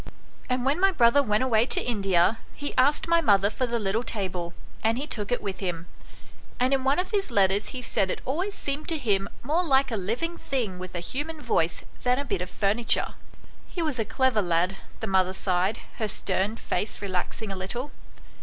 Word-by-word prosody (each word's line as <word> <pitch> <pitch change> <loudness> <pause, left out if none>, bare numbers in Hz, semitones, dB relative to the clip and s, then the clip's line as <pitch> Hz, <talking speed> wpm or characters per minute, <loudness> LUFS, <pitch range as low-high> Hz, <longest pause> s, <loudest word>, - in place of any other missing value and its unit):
And 250 0 0
when 280 +5 +2
my 390 +1 +5
brother 245 -3 +5
went 215 -2 +1
away 235 -2 +3
to - - +4
India, 195 -2 +2 0.2
he 290 - -4
asked 285 +5 +3
my 335 0 +4
mother 200 -7 +4
for 255 +4 -1
the 235 0 0
little 210 +1 0
table, 185 -7 -3 0.3
and 225 +1 +2
he 275 - -2
took 210 -7 -3
it 245 - 0
with 195 -2 -4
him; 175 -3 -3 0.7
and 255 +2 +3
in 265 -1 +2
one 270 +2 +3
of 365 +3 -1
his 400 -5 0
letters 200 -2 +2
he 255 -2 -6
said 195 -5 +1
it - - -2
always 360 +9 -2
seemed 285 +2 -3
to 325 - +1
him 200 -7 0
more 315 +8 +1
like 275 -4 +3
a - - 0
living 235 - -2
thing 225 -9 -2
with 185 0 -7
a 175 - -2
human 295 - -4
voice 165 - 0 0.2
than 250 0 +2
a 280 - -2
bit 185 - -1
of 180 - -4
furniture." 210 +5 +1 0.5
"He 345 - -3
was 300 -6 -1
a - - +3
clever 225 +1 +2
lad," 175 +1 +1 0.3
the - - -1
mother 190 -2 +2
sighed, 190 +2 0 0.2
her 220 - -1
stern 200 +1 -1
face 215 -2 -2
relaxing 195 +2 -3
a - - -3
little. 240 +9 -4
225 Hz, 205 wpm, -26 LUFS, 195-275 Hz, 0.7 s, my